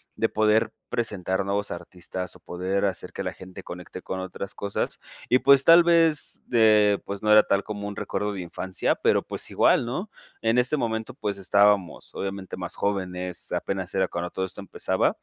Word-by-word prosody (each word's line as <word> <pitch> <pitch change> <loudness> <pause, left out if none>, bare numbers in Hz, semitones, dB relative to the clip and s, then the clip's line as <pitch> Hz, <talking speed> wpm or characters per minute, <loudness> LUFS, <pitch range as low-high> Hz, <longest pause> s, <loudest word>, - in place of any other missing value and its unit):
de - - +1
poder 110 +1 +2 0.2
presentar 95 -5 -1
nuevos 100 +1 -1
artistas 90 +1 -5
o - - -15
poder 95 +3 -2
hacer 95 - -3
que - - -4
la - - -2
gente 95 0 -11
conecte 90 +1 -9
con 95 - -5
otras 95 +1 -6
cosas 100 0 -3 0.3
y 125 - +6
pues 135 +1 +6
tal 170 +3 +8
vez 165 -3 +3
de 105 -3 +4
pues 100 0 -5
no 105 - +3
era 105 0 +8
tal 100 0 +1
como 105 -1 -5
un 100 - -6
recuerdo 105 +1 -3
de 95 - -5
infancia 90 +1 -2
pero - - +2
pues - - -4
igual, - - +3
¿no? 175 - -4 0.3
En 115 +2 +2
este 125 +5 +2
momento 110 -3 -2
pues 105 -2 -3
estábamos 100 -1 +2
obviamente 95 -1 -5
más 90 -2 -5
jóvenes, 90 -3 -2
apenas 95 -2 -3
era 95 - +2
cuando 85 0 -4
todo 95 - -2
esto 95 - -8
empezaba, 100 - 0
100 Hz, 185 wpm, -25 LUFS, 95-110 Hz, 0.3 s, tal